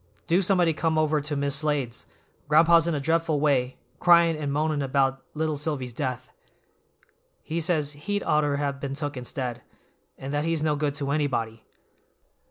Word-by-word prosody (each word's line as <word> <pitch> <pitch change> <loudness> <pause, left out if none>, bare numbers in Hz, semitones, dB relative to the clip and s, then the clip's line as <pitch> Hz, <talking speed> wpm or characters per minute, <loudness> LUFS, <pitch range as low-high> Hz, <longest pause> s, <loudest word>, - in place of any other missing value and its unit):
"Do 175 +3 +3
somebody 180 -3 +2
come 160 +1 0
over 155 -1 +2
to 150 +1 -4
Mis' 140 0 +1
Slade's; 140 -6 -2 0.4
gran'pa's 165 +2 +5
in 170 - 0
a - - -1
dreadful 160 +1 +1
way, 135 -4 +1 0.2
cryin' 170 -2 +5
and 150 -2 -3
moanin' 150 0 0
about 135 0 +1
little 155 0 -1
Silvy's 140 -4 -3
death. 130 -1 -4 1.1
He 165 +2 -3
says 155 -4 0
he'd 205 +8 -3
oughter 150 -2 +1
have 140 -1 -2
been 140 -1 -4
took 145 0 -4
instead, 125 -1 -4 0.6
and 135 +2 -6
that 145 0 0
he's 165 -1 -1
no 155 -1 +1
good 145 -1 -1
to 140 -1 -2
anybody. 120 -7 -2
150 Hz, 165 wpm, -26 LUFS, 140-160 Hz, 1.1 s, gran'pa's